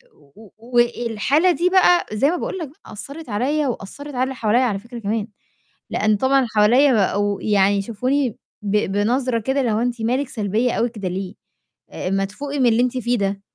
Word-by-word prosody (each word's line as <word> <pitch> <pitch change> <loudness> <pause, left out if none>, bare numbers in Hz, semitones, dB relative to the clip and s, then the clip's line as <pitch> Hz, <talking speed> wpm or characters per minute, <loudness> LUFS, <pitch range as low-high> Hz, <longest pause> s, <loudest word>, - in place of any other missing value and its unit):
و 170 +9 -18
والحالة 240 - +1
دي 350 +2 +1
بقى 360 -2 +4
زي 275 +8 +2
ما - - -1
باقول 380 - -4
لك 310 -5 -5 0.2
أثّرت 280 +7 -9
عليَّ 275 +8 0
وأثّرت 255 +5 -6
على 250 - +1
اللي 265 0 -3
حواليّا 230 +2 +2
على 205 -5 0
فكرة 235 +2 -10
كمان، 215 +1 -2 0.6
لأن 215 0 +2
طبعًا 265 +4 +2
اللي 245 -4 -1
حواليّا 245 +6 +5
بقوا 205 -1 +1
يعني 200 -1 +3
يشوفوني 250 +5 -1 0.3
ب 205 +1 +1 0.2
بنظرة 240 +3 +1
كده 265 +5 -1
اللي 235 -3 0
هو: 215 - +1
"أنتِ 240 -1 -2
مالِك 255 +4 0
سلبية 220 +2 0
أوي 235 - 0
كده 210 -5 -6
ليه؟ 190 +1 -5 0.8
ما 195 0 +1
تفوقي 280 +8 -5
من 250 - +4
اللي 230 +2 +3
أنتِ 250 +1 -1
فيه 240 +1 0
ده، 195 0 -2
235 Hz, 185 wpm, -21 LUFS, 205-265 Hz, 0.8 s, حواليّا